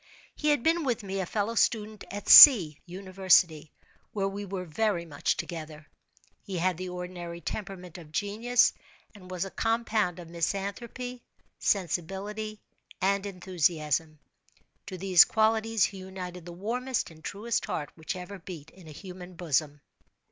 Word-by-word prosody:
He 305 Hz, -, -4 dB
had 290 Hz, -5 st, +2 dB
been 330 Hz, +1 st, +2 dB
with 245 Hz, -5 st, -1 dB
me 195 Hz, 0 st, -4 dB
a 185 Hz, -, -2 dB
fellow 210 Hz, +3 st, -2 dB
student 215 Hz, -2 st, 0 dB
at 205 Hz, +1 st, -7 dB
C—— 180 Hz, -, +10 dB
University, 185 Hz, -4 st, +1 dB, 0.4 s
where 195 Hz, -2 st, -1 dB
we 200 Hz, +1 st, -5 dB
were 190 Hz, -1 st, -5 dB
very 175 Hz, +1 st, -1 dB
much 145 Hz, -3 st, -2 dB
together. 155 Hz, -2 st, -7 dB, 0.6 s
He 190 Hz, -2 st, -6 dB
had 180 Hz, 0 st, 0 dB
the 185 Hz, 0 st, -5 dB
ordinary 180 Hz, -1 st, -7 dB
temperament 180 Hz, -1 st, -7 dB
of 155 Hz, -3 st, -14 dB
genius, 220 Hz, +7 st, +2 dB, 0.4 s
and 185 Hz, -4 st, -14 dB
was 185 Hz, 0 st, -3 dB
a 195 Hz, -, -8 dB
compound 225 Hz, -5 st, 0 dB
of 175 Hz, -2 st, -10 dB
misanthropy, 205 Hz, +9 st, -4 dB, 0.4 s
sensibility, 200 Hz, +4 st, -2 dB, 0.4 s
and 200 Hz, +1 st, 0 dB
enthusiasm. 165 Hz, -5 st, -1 dB, 0.7 s
To 190 Hz, -2 st, -6 dB
these 185 Hz, -2 st, +7 dB
qualities 220 Hz, -1 st, +1 dB
he 195 Hz, -, -6 dB
united 180 Hz, -2 st, -8 dB
the -, -, -7 dB
warmest 235 Hz, +6 st, -3 dB
and 160 Hz, -1 st, -17 dB
truest 215 Hz, +3 st, -3 dB
heart 150 Hz, -, -4 dB
which 170 Hz, +3 st, -6 dB
ever 185 Hz, +2 st, -8 dB
beat 165 Hz, -3 st, -10 dB
in 185 Hz, -3 st, -16 dB
a -, -, -10 dB
human 180 Hz, +2 st, -10 dB
bosom. 150 Hz, -3 st, -1 dB
185 Hz, 150 wpm, -28 LUFS, 170-210 Hz, 0.7 s, C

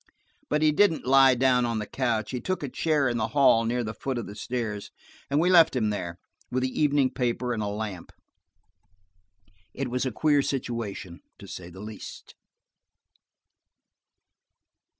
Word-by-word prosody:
But 150 Hz, +1 st, +1 dB
he 155 Hz, -, +5 dB
didn't 165 Hz, +1 st, +2 dB
lie 135 Hz, 0 st, +6 dB
down 125 Hz, 0 st, +3 dB
on 115 Hz, -1 st, -1 dB
the 105 Hz, -, -3 dB
couch. 115 Hz, -3 st, -1 dB
He 125 Hz, -2 st, -4 dB
took 185 Hz, -4 st, -2 dB
a 140 Hz, -, -3 dB
chair 150 Hz, 0 st, +1 dB
in 120 Hz, -1 st, -1 dB
the 110 Hz, -, 0 dB
hall 115 Hz, -5 st, +5 dB
near 120 Hz, +1 st, 0 dB
the 110 Hz, -1 st, -4 dB
foot 130 Hz, +2 st, -4 dB
of 120 Hz, -, -4 dB
the 100 Hz, -, -8 dB
stairs, 105 Hz, -2 st, -4 dB, 0.4 s
and 140 Hz, +1 st, +2 dB
we 170 Hz, -, +2 dB
left 165 Hz, -6 st, +6 dB
him 110 Hz, -4 st, +1 dB
there, 85 Hz, -4 st, -4 dB, 0.3 s
with 130 Hz, +1 st, -1 dB
the 130 Hz, -, +1 dB
evening 145 Hz, -3 st, +3 dB
paper 125 Hz, -1 st, -1 dB
and 110 Hz, -, -3 dB
a 105 Hz, -, -2 dB
lamp. 100 Hz, -3 st, -5 dB, 1.6 s
It 135 Hz, -2 st, -3 dB
was 125 Hz, 0 st, -1 dB
a -, -, -2 dB
queer 145 Hz, +4 st, +2 dB
situation, 115 Hz, -10 st, -4 dB, 0.2 s
to -, -, -12 dB
say 90 Hz, -1 st, -8 dB
the 95 Hz, +2 st, -11 dB
least. 105 Hz, 0 st, -9 dB
125 Hz, 170 wpm, -26 LUFS, 110-135 Hz, 1.6 s, lie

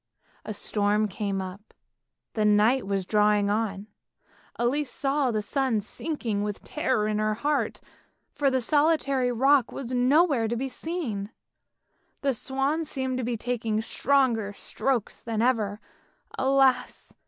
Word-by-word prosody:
A 215 Hz, -, -4 dB
storm 210 Hz, +1 st, 0 dB
came 200 Hz, -1 st, -3 dB
up, 190 Hz, +3 st, -10 dB, 0.6 s
and 210 Hz, -1 st, +3 dB
night 225 Hz, +2 st, +3 dB
was 195 Hz, -2 st, -1 dB
drawing 210 Hz, 0 st, +3 dB
on; 205 Hz, -2 st, -1 dB, 0.7 s
Elise 260 Hz, +4 st, 0 dB
saw 275 Hz, 0 st, 0 dB
the 215 Hz, -3 st, -1 dB
sun 260 Hz, -1 st, 0 dB
sinking 225 Hz, -1 st, -3 dB
with 205 Hz, -1 st, -4 dB
terror 260 Hz, -8 st, 0 dB
in 215 Hz, 0 st, 0 dB
her 215 Hz, 0 st, +1 dB
heart, 290 Hz, +6 st, -1 dB, 0.5 s
for 285 Hz, -2 st, +1 dB
the 260 Hz, -1 st, +1 dB
solitary 280 Hz, -2 st, +2 dB
rock 265 Hz, +1 st, +3 dB
was 255 Hz, -2 st, -6 dB
nowhere 260 Hz, 0 st, +3 dB
to 235 Hz, -, -1 dB
be 265 Hz, +3 st, -3 dB
seen. 250 Hz, -, -4 dB, 0.9 s
The 275 Hz, -1 st, +1 dB
swans 275 Hz, +6 st, -1 dB
seemed 260 Hz, -2 st, -2 dB
to -, -, -2 dB
be 235 Hz, 0 st, -2 dB
taking 225 Hz, -2 st, -1 dB
stronger 230 Hz, -3 st, +1 dB
strokes 245 Hz, +2 st, -2 dB
than 225 Hz, -2 st, -3 dB
ever; 220 Hz, -4 st, +1 dB, 0.6 s
alas! 265 Hz, -1 st, +1 dB
240 Hz, 135 wpm, -26 LUFS, 210-270 Hz, 0.9 s, and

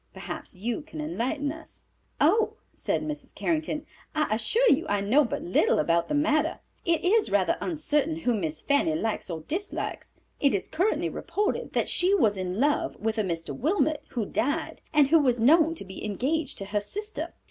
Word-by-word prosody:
Perhaps -, -, -7 dB
you 230 Hz, -, -3 dB
can 310 Hz, +1 st, -10 dB
enlighten 290 Hz, -1 st, -2 dB
us." 320 Hz, +1 st, -11 dB, 0.4 s
"Oh," 435 Hz, +8 st, +3 dB, 0.2 s
said -, -, -1 dB
Mrs. 300 Hz, -1 st, -5 dB
Carrington, 310 Hz, -2 st, -1 dB, 0.3 s
"I 305 Hz, -7 st, +1 dB
assure 440 Hz, -, +2 dB
you 270 Hz, -, +2 dB
I 205 Hz, 0 st, +1 dB
know 225 Hz, +10 st, +4 dB
but 235 Hz, -, -3 dB
little 175 Hz, -, +3 dB
about 170 Hz, +2 st, +2 dB
the -, -, -1 dB
matter. 310 Hz, +2 st, +2 dB, 0.2 s
It 335 Hz, 0 st, +1 dB
is 420 Hz, +4 st, +3 dB
rather -, -, +2 dB
uncertain 305 Hz, -2 st, 0 dB
whom 245 Hz, -10 st, 0 dB
Miss 160 Hz, -2 st, -3 dB
Fanny 300 Hz, +3 st, +2 dB
likes 225 Hz, -9 st, -2 dB
or 165 Hz, -2 st, -4 dB
dislikes. 360 Hz, -, -4 dB, 0.2 s
It 280 Hz, -6 st, +3 dB
is 195 Hz, -, -2 dB
currently 370 Hz, +7 st, 0 dB
reported 415 Hz, +1 st, -2 dB
that -, -, +1 dB
she 375 Hz, +3 st, +3 dB
was 220 Hz, -, +3 dB
in 185 Hz, +1 st, -3 dB
love 290 Hz, +3 st, +1 dB
with 220 Hz, 0 st, -1 dB
a -, -, +2 dB
Mr. 165 Hz, -3 st, -3 dB
Wilmot, 310 Hz, 0 st, +1 dB
who 230 Hz, -4 st, -2 dB
died, 290 Hz, +10 st, -2 dB
and 290 Hz, -2 st, +4 dB
who 325 Hz, +2 st, +6 dB
was 250 Hz, -5 st, +2 dB
known 320 Hz, +7 st, +5 dB
to 320 Hz, -, -8 dB
be 190 Hz, 0 st, -9 dB
engaged 270 Hz, +8 st, -1 dB
to 195 Hz, -, -5 dB
her 205 Hz, -, +2 dB
sister. 420 Hz, -, -5 dB
290 Hz, 185 wpm, -27 LUFS, 215-320 Hz, 0.4 s, who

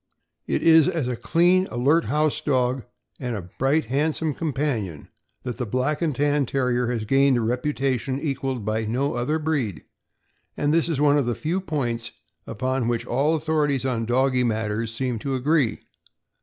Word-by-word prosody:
It -, -, -1 dB
is 160 Hz, -2 st, +6 dB
as 165 Hz, -8 st, -1 dB
a 125 Hz, -, -1 dB
clean, 180 Hz, +8 st, +3 dB
alert 145 Hz, +7 st, +2 dB
house 150 Hz, 0 st, +1 dB
dog 130 Hz, -2 st, 0 dB, 0.3 s
and 125 Hz, -3 st, -3 dB
a 90 Hz, -4 st, -7 dB
bright, 140 Hz, +4 st, +2 dB
handsome 150 Hz, +5 st, 0 dB
companion 135 Hz, -, -3 dB, 0.3 s
that 125 Hz, -2 st, -4 dB
the 125 Hz, -, -1 dB
Black 130 Hz, +7 st, -1 dB
and 155 Hz, -5 st, 0 dB
Tan 145 Hz, -1 st, +1 dB
Terrier 125 Hz, -2 st, 0 dB
has 115 Hz, -3 st, -2 dB
gained 135 Hz, +2 st, +3 dB
a -, -, 0 dB
reputation 130 Hz, +2 st, -1 dB
equaled 135 Hz, -6 st, -3 dB
by 110 Hz, +1 st, -1 dB
no 130 Hz, +6 st, -1 dB
other 125 Hz, +6 st, 0 dB
breed; 145 Hz, -, -2 dB, 0.7 s
and 145 Hz, +1 st, +1 dB
this 165 Hz, +1 st, +2 dB
is 155 Hz, -5 st, -1 dB
one 145 Hz, 0 st, +4 dB
of 135 Hz, -, -1 dB
the 120 Hz, -, 0 dB
few 170 Hz, +5 st, -2 dB
points 120 Hz, -9 st, -3 dB, 0.3 s
upon 130 Hz, +2 st, -1 dB
which 120 Hz, -1 st, -1 dB
all 145 Hz, +6 st, +1 dB
authorities 150 Hz, -4 st, 0 dB
on 115 Hz, -4 st, -1 dB
doggy 130 Hz, +1 st, +2 dB
matters 110 Hz, -1 st, -1 dB
seem 120 Hz, 0 st, -2 dB
to 135 Hz, +3 st, -2 dB
agree. 135 Hz, -2 st, +1 dB
135 Hz, 170 wpm, -24 LUFS, 120-150 Hz, 0.7 s, is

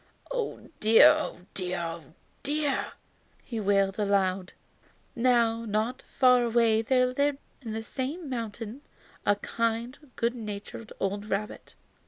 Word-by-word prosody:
"Oh -, -, -3 dB
dear, 220 Hz, +1 st, +8 dB
oh -, -, 0 dB
dear, 180 Hz, -1 st, -2 dB
oh 165 Hz, -1 st, -4 dB, 0.4 s
dear!" 290 Hz, -1 st, -1 dB, 0.5 s
he 230 Hz, -3 st, -4 dB
wailed 195 Hz, -1 st, +2 dB
aloud. 195 Hz, -3 st, +1 dB, 0.6 s
Now, 230 Hz, -2 st, +3 dB
not 220 Hz, +4 st, -1 dB
far 250 Hz, -2 st, +4 dB
away 230 Hz, -1 st, +3 dB
there 255 Hz, +2 st, +3 dB
lived 280 Hz, +3 st, +1 dB, 0.2 s
in 225 Hz, -4 st, -5 dB
the 225 Hz, 0 st, -3 dB
same 285 Hz, +8 st, -4 dB
mountain 230 Hz, 0 st, -5 dB, 0.5 s
a 205 Hz, -, +5 dB
kind, 230 Hz, +4 st, -2 dB, 0.2 s
good 235 Hz, +1 st, 0 dB
natured 215 Hz, -1 st, -7 dB
old 200 Hz, +1 st, -2 dB
rabbit. 210 Hz, +1 st, -4 dB
225 Hz, 125 wpm, -28 LUFS, 205-255 Hz, 0.6 s, dear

